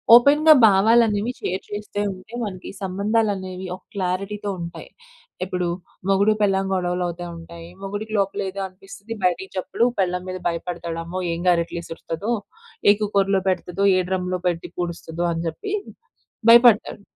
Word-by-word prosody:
ఓపెన్‌గా 295 Hz, +5 st, +7 dB
భావాలు 220 Hz, +4 st, +5 dB
అనేవి 210 Hz, +3 st, -1 dB
షేర్ 185 Hz, +1 st, -3 dB
చేస్తే 205 Hz, 0 st, -5 dB
ఉంటే 185 Hz, +5 st, -15 dB
మనకు 185 Hz, -3 st, -6 dB
సంబంధాలు 205 Hz, +3 st, +1 dB
అనేవి 185 Hz, 0 st, -6 dB
ఒక -, -, -17 dB
క్లారిటీ‌తో 200 Hz, +2 st, -2 dB
ఉంటాయి. 170 Hz, 0 st, -7 dB, 0.5 s
ఇప్పుడు 180 Hz, -1 st, -2 dB, 0.4 s
మొగుడు 200 Hz, +2 st, +4 dB
పెళ్ళాం 195 Hz, -1 st, +2 dB
గొడవలు 180 Hz, -1 st, 0 dB
అవుతా 175 Hz, +1 st, -5 dB
ఉంటాయి. 165 Hz, 0 st, -11 dB
మొగుడికి 205 Hz, +2 st, -5 dB
లోపల 195 Hz, 0 st, 0 dB
ఏదో 195 Hz, +1 st, -7 dB
అనిపిస్తది 195 Hz, +4 st, -10 dB
బయటకి 185 Hz, +1 st, +1 dB
చెప్పడు, 185 Hz, +5 st, -1 dB, 0.2 s
పెళ్ళాం 180 Hz, -1 st, 0 dB
మీద 185 Hz, 0 st, -4 dB
భయపడతాడు. 170 Hz, 0 st, -3 dB
అమ్మో! 180 Hz, +3 st, -5 dB
ఏం 165 Hz, -, -3 dB
గరెట్లు 170 Hz, -1 st, +2 dB
ఇసురుతదో! 165 Hz, +6 st, -5 dB, 0.6 s
ఏ -, -, +10 dB
కుక్కర్‌లో 195 Hz, -2 st, +2 dB
పెడతాదో! 185 Hz, +1 st, 0 dB
ఏ -, -, +3 dB
డ్రమ్‌లో 185 Hz, -1 st, -1 dB
పెట్టి 170 Hz, -1 st, -2 dB
పూడుస్తదో! 170 Hz, -1 st, -4 dB
అని 165 Hz, 0 st, -2 dB
చెప్పి 165 Hz, -, -5 dB, 0.8 s
భయపడతాడు. 235 Hz, -3 st, +6 dB
190 Hz, 145 wpm, -23 LUFS, 175-205 Hz, 0.8 s, ఏ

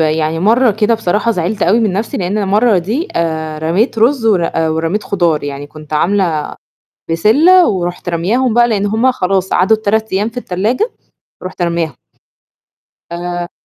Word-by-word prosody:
يعني 155 Hz, 0 st, 0 dB
مرّة 230 Hz, +4 st, +3 dB
كده 215 Hz, +2 st, +1 dB
بصراحة 215 Hz, +2 st, 0 dB
زعلت 185 Hz, +1 st, -2 dB
أوي 215 Hz, +6 st, +3 dB
من 215 Hz, -4 st, +1 dB
نَفْسي 205 Hz, +4 st, -3 dB
لإن 190 Hz, +2 st, -2 dB
المَرّة 210 Hz, +1 st, +2 dB
دي 230 Hz, -, -3 dB
آآ 160 Hz, -2 st, -2 dB
رميت 185 Hz, -, 0 dB
رُز 235 Hz, 0 st, +2 dB
ور 185 Hz, -6 st, +2 dB
ورميت 165 Hz, +5 st, -1 dB
خضار، 170 Hz, -6 st, 0 dB
يعني 145 Hz, 0 st, -6 dB
كنت 155 Hz, 0 st, -13 dB
عاملة 170 Hz, -1 st, 0 dB, 0.6 s
بسِلة 310 Hz, -, +4 dB
ورُحت 175 Hz, -2 st, -3 dB
رامياهم 215 Hz, +9 st, 0 dB
بقى 240 Hz, 0 st, +4 dB
لإن 205 Hz, -3 st, 0 dB
هم 225 Hz, +5 st, +2 dB
خلاص 190 Hz, -4 st, -1 dB
عدُّوا 190 Hz, +5 st, +3 dB
ال3 220 Hz, 0 st, -1 dB
أيام 205 Hz, +4 st, 0 dB
في 235 Hz, -, -13 dB
التلاجة، 240 Hz, -, -1 dB, 0.5 s
رُحت 185 Hz, 0 st, -6 dB
رامياهم. 170 Hz, -5 st, -1 dB, 1.2 s
آآ 175 Hz, 0 st, -4 dB
190 Hz, 155 wpm, -14 LUFS, 170-220 Hz, 1.2 s, بسِلة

